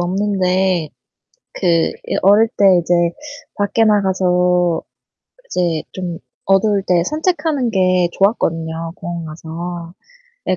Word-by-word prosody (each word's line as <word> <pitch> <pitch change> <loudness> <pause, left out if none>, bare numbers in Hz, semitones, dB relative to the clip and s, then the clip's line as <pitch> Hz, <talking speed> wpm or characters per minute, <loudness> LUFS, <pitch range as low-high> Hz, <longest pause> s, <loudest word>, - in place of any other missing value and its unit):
없는데 185 -2 0 0.7
그 185 - -2 0.4
예 - - -1
어릴 205 +4 +5
때 200 - +4 0.2
이제 175 +1 0 0.6
밖에 205 +2 +1
나가서 180 -4 +2 0.7
이제 170 - -1
좀 175 -3 -5 0.3
어두울 195 +1 +2
때 175 -2 +3
산책하는 305 - -1
게 185 -3 +2
좋았거든요 165 -5 -1
공원 170 -1 -6
가서. 170 +2 -7 0.5
예. 185 - +2
185 Hz, 210 characters per minute, -18 LUFS, 170-205 Hz, 0.7 s, 어릴